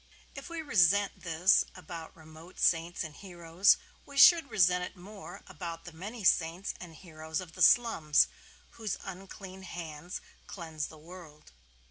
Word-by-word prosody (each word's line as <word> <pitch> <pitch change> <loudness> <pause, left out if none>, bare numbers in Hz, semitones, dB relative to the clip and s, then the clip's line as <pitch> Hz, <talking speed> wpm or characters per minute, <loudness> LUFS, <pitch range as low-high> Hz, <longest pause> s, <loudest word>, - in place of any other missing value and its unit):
If - - -9
we 335 -1 -5
resent 200 - +3
this 175 +3 +3
about 170 -3 -9
remote 160 +2 -14
saints 170 +1 +1
and 155 -2 -8
heroes, 175 0 +2 0.3
we 280 - -12
should 335 -1 +7
resent 180 -3 +3
it - - -7
more 200 +3 -11
about 170 -1 -8
the 175 - -8
many 205 +7 -8
saints 175 +2 +1
and 170 -3 -10
heroes 160 -2 -6
of 180 -3 -9
the - - -9
slums, 165 -11 +5 0.5
whose 220 -4 -4
unclean 190 0 -9
hands 175 -2 -7 0.3
cleanse 160 -5 -5
the 160 - -14
world. 160 - -14
175 Hz, 145 wpm, -30 LUFS, 160-195 Hz, 0.5 s, should